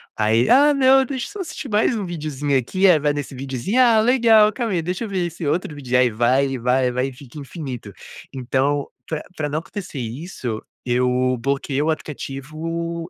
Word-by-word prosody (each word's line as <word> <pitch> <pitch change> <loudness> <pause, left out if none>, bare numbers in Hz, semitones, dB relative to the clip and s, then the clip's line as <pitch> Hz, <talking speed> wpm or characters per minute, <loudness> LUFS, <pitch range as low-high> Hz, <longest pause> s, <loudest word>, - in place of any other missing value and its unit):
aí, 110 +3 +2
"ah, 290 +3 +6
não, 270 0 +5
deixa 260 -1 -4
eu - - -11
só 410 - -9
assistir 310 -5 -6
mais 215 +3 +2
um 210 -3 -3
videozinho 150 -5 -2
aqui", 185 +10 +2
aí 175 -4 +6
vai 145 0 +1
nesse 145 -2 -5
videozinho, 135 - -2
"ah, 235 -3 +5
legal, 225 -3 +5
calma 230 -2 -2
aí, 175 - +1
deixa 180 +7 -3
eu - - -7
ver 185 -3 -1
esse 170 -1 -6
outro 155 +1 -1
vídeo", 130 -3 -1
aí 125 -1 +4
vai, 125 +5 +2
e 135 - -3
vai, 125 +2 +2
e - - 0
vai 125 +2 -1
e 135 - -8
fica 130 +2 -12
infinito. 135 - -7 0.4
Então 135 +2 0 0.2
pra 160 -2 -4
pra 150 -3 -2
não 150 +2 -1
acontecer 175 -3 -7
isso, 120 - -5 0.2
eu 125 +1 +1
bloqueei 140 +2 -1
o 155 - 0
aplicativo 160 +3 -4
150 Hz, 200 wpm, -21 LUFS, 130-190 Hz, 0.4 s, ah